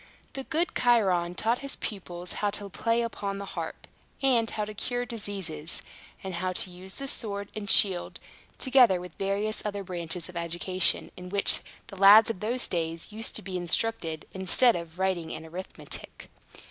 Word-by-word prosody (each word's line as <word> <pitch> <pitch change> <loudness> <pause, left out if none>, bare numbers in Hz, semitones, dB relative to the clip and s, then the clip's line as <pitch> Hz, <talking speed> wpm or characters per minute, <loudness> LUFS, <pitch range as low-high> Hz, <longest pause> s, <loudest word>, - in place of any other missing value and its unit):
The 270 -1 -6
good 330 +2 0
Chiron 190 -8 +2
taught 230 +5 0
his 275 -1 -4
pupils 180 -3 -6
how 205 - +2
to 205 0 -4
play 230 +4 0
upon 200 -3 -4
the 200 - -6
harp, - - -6 0.3
and 245 -5 +2
how 210 - -3
to 215 - -8
cure 245 +4 -3
diseases, 195 -9 -3 0.4
and 190 -1 -5
how 185 +2 -2
to 180 - -1
use 185 +2 -6
the 275 - -4
sword 200 -6 -3
and 210 -1 -5
shield, 190 -5 +4 0.4
together 250 -8 +4
with 180 -2 -9
various 200 +2 -1
other 205 -1 -4
branches 170 -2 -3
of 180 - -12
education, 175 +2 +1
in 180 0 -9
which 200 +1 +6 0.3
the 195 - -12
lads 210 +4 +8
of 190 - -8
those 240 +5 -1
days 165 +1 -3
used 220 +2 -1
to - - -3
be 185 0 -4
instructed, 175 -2 +2
instead 190 +6 +4
of 170 -1 -7
writing 185 -4 -1
and 160 +1 -9
arithmetic. 180 +4 -7
195 Hz, 170 wpm, -27 LUFS, 180-225 Hz, 0.4 s, lads